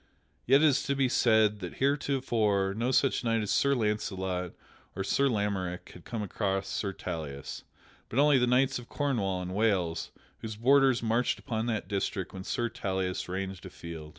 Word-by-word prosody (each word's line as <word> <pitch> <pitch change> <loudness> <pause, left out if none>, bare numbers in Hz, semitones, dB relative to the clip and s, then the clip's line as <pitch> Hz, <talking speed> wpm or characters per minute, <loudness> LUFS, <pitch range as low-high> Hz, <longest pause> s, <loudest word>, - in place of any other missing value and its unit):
(Yet 135 +4 +6
it - - +7
is 145 -4 +4
to 140 - +1
be 135 -1 +2
said 110 -4 +3
that 90 -2 -6
heretofore 120 -8 +1
no 115 +3 0
such 130 0 +2
knight 115 -2 +1
as 105 - -2
Sir 140 0 +3
Launcelot 95 -5 -2 0.4
or 95 - -2
Sir 140 +8 +2
Lamorack 100 -5 -2
had 90 - -14
come 115 -3 -4
against 95 -1 -2
Sir 100 - -1
Tauleas, 80 -7 -6 0.5
but 115 - -5
only 145 -1 +5
the 125 - +2
knights 130 +1 +2
of 120 - -13
Cornwall 100 -11 -1
and 90 0 -5
Wales, 95 -6 0 0.3
whose 110 -1 -6
borders 130 +2 +4
marched 115 +2 +1
upon 115 -3 -3
that 110 -5 -2
district 100 -2 -2
where 95 -1 -7
Sir 120 +4 -1
Tauleas 95 -4 -3
ranged 95 0 -4
afield.) 80 -2 -8
105 Hz, 175 wpm, -29 LUFS, 95-125 Hz, 0.5 s, it